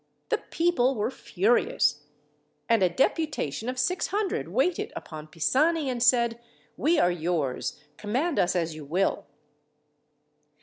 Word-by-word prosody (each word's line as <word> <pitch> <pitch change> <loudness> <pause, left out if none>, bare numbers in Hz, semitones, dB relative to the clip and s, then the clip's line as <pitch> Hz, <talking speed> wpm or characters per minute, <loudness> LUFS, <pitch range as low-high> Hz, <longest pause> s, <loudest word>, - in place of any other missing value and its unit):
The - - +1
people 300 -7 +1
were 215 +3 -1
furious; 180 - +1 0.6
and 230 -3 +3
a 185 - +4
deputation 250 - -1
of 255 - -4
600 385 - -1
waited 365 -8 0
upon 155 -1 -8
Pisani 270 - +1
and 240 -1 -4
said: 235 -1 +3 0.4
"We 325 +4 +2
are 175 - +4
yours. 160 -6 -2 0.2
Command 260 +10 -1
us 175 - +2
as 165 -2 -1
you 155 -1 -9
will." 175 +7 -1
235 Hz, 125 wpm, -27 LUFS, -, 0.6 s, a